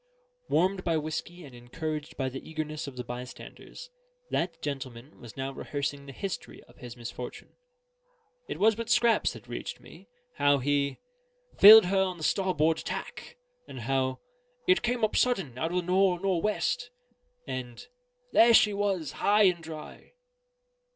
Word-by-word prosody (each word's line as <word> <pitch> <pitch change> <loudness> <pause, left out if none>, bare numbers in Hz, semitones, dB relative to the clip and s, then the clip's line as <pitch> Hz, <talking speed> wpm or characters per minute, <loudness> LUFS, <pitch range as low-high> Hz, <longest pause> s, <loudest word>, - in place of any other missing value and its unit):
Warmed 185 +2 +1
by 165 -2 +1
whiskey 155 +3 -5
and 135 - -13
encouraged 150 +5 -6
by 135 - -1
the 135 +3 -7
eagerness 155 -1 -4
of 140 - -8
the 125 - -5
bystanders, 125 - -9 0.4
that 165 -1 -1
gentleman 135 -2 -6
was 120 -1 -12
now 135 0 -3
rehearsing 140 0 -4
the - - -7
history 190 +7 -6
of - - -22
his 120 -1 -9
misfortune. 120 +1 -8 0.9
It - - -5
was 220 +2 +5
but 230 +2 -6
scraps 235 -1 +3
that - - -13
reached - - -6
me: - - -15 0.3
how 145 0 +4
he 140 +1 0 0.6
"filled 215 +1 +11
her 190 +1 +2
on 185 -2 -1
the 160 - -8
starboard 165 -4 +1
tack," - - -6 0.3
and - - -8
how 130 +1 0 0.5
"it 370 +1 +4
came 240 -1 -1
up 215 - +1
sudden 190 - +1
out 160 - -1
of 180 - -2
the 180 - 0
nor'nor'west," 190 - +1 0.6
and 125 -2 -6 0.5
"there 230 0 +6
she 210 -1 +5
was, 195 -6 -1
high 210 +1 +3
and 180 -3 +3
dry." 160 - -10
160 Hz, 150 wpm, -28 LUFS, 135-195 Hz, 0.9 s, filled